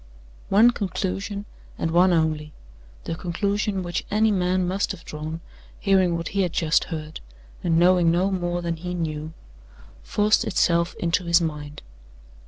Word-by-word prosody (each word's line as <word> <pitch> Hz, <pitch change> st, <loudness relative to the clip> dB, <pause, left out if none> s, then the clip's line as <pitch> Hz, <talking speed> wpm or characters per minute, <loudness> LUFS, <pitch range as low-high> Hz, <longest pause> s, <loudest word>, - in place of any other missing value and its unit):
One 220 Hz, +5 st, +6 dB
conclusion, 200 Hz, 0 st, -3 dB, 0.3 s
and 165 Hz, -, -1 dB
one 180 Hz, +2 st, +5 dB
only 155 Hz, -2 st, 0 dB, 0.5 s
the 165 Hz, -, -4 dB
conclusion 200 Hz, +3 st, -1 dB
which 175 Hz, 0 st, -3 dB
any 215 Hz, +1 st, +3 dB
man 185 Hz, -1 st, +1 dB
must 190 Hz, +2 st, -1 dB
have 170 Hz, -, -12 dB
drawn, 155 Hz, +2 st, -6 dB, 0.4 s
hearing 190 Hz, -4 st, +3 dB
what 170 Hz, -, -4 dB
he 200 Hz, -, 0 dB
had 180 Hz, -3 st, -1 dB
just 160 Hz, -1 st, +2 dB
heard, 155 Hz, -2 st, -6 dB, 0.4 s
and 165 Hz, -2 st, +2 dB
knowing 175 Hz, 0 st, +5 dB
no 180 Hz, +4 st, +2 dB
more 175 Hz, -2 st, -2 dB
than 170 Hz, -1 st, -2 dB
he 180 Hz, +2 st, -5 dB
knew 155 Hz, -2 st, -3 dB, 0.7 s
forced 210 Hz, 0 st, +2 dB
itself 170 Hz, -4 st, +1 dB
into 175 Hz, +1 st, 0 dB
his 170 Hz, 0 st, +5 dB
mind. 150 Hz, -, -5 dB
175 Hz, 150 wpm, -24 LUFS, 165-190 Hz, 0.7 s, One